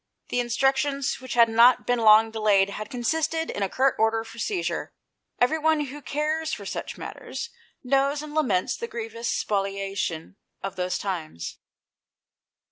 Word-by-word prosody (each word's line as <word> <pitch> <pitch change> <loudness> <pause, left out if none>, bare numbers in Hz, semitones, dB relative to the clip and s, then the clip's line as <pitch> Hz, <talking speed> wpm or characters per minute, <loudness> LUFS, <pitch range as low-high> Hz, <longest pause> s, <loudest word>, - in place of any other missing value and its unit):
The 245 - 0
instructions, 270 +3 +1
which 260 -2 -5
had 235 -1 +7
not 235 +3 +5
been 245 -1 +1
long 220 0 +6
delayed, 205 -3 +3
had 215 +1 -6
consisted 320 +6 -1
in - - -5
a 195 - 0
curt 265 +4 +2
order 225 0 +2
for 230 +1 -12
seizure. 370 - -2 0.4
Everyone 315 +5 +3
who 290 +1 -6
cares 310 +3 -1
for 200 - -5
such - - -5
matters, - - -7 0.3
knows 275 +3 +1
and 300 -1 -8
laments 230 -13 +1
the 465 - -5
grievous 230 - -5
spolia 195 -1 -2
tion 165 0 -3 0.3
of 195 0 -4
those 180 0 -1
times. 165 - -5
235 Hz, 150 wpm, -25 LUFS, 205-285 Hz, 0.4 s, had